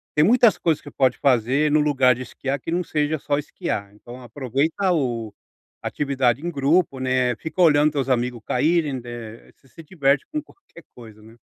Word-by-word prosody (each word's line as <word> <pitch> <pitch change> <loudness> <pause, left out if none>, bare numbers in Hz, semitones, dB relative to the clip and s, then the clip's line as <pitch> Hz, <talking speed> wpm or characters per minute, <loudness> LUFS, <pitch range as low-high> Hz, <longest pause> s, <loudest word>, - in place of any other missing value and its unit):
tem 150 - +4
muitas 235 +1 +4
coisas 160 -3 0
que 145 - -11
você - - -22
pode 130 -2 +2
fazer 135 +3 +2
no 155 - +4
lugar 135 -4 +3
de 130 - -6
esquiar 135 +2 -4
que 165 - -6
não 180 +2 0
seja 155 -1 -1
só 145 0 -1
esquiar. 100 -8 -4
Então, 120 +4 -12
aproveita 140 - -1
o 120 -9 -1 0.5
atividade 135 -3 0
em 175 - -2
grupo, 145 0 +1
né, 130 -1 +1
fica 160 +7 -4
olhando 150 -2 +5
teus 140 -2 -2
amigos 125 -2 -1
caírem, 150 0 +1
eh, 115 -2 -9
você - - -27
se 165 - -14
diverte 140 -5 +1
com 305 - -1
qualquer 300 - -19
coisa, 110 -3 -13
né. 110 +1 -16
140 Hz, 190 wpm, -22 LUFS, 125-155 Hz, 0.5 s, olhando